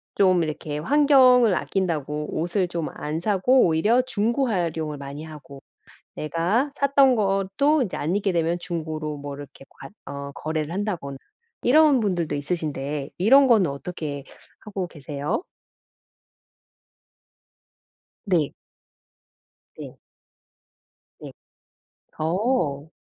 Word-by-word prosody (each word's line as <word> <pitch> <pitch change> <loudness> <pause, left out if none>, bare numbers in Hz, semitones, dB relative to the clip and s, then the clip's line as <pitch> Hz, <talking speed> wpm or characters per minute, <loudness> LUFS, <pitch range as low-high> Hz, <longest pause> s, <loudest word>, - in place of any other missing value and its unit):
좀 185 -3 +4
이렇게 155 -1 -4
환경을 255 - +5
아낀다고 150 -5 -2
옷을 175 +3 0
좀 170 -2 -3
안 155 +2 -4
사고 215 +7 +3
오히려 210 +10 +3
중고 245 +2 0
활용을 165 -7 -2
많이 140 +2 -7
하고 150 -3 -11 0.5
내가 180 - 0
샀던 275 -2 +4
것도 200 +9 +1
이제 200 - -5
안 165 +6 -1
입게 200 -2 0
되면 170 +1 0
중고로 155 -3 -4
뭐 145 0 -7
이렇게 140 -1 -12
과 135 - -12 0.2
어 140 0 -6
거래를 155 0 -3
한다거나 175 -8 -3 0.5
이런 290 -1 +5
분들도 175 -7 -1
있으신데 145 -2 -3
이런 265 +9 +6
거는 210 - +4
어떻게 145 -1 -6 0.3
하고 200 -4 -5
계세요? 145 - -4 2.9
네. 170 -7 +1 1.2
네. - - -9 1.2
네. - - -9 0.9
어. 160 - 0
170 Hz, 215 characters per minute, -24 LUFS, 150-215 Hz, 2.9 s, 이런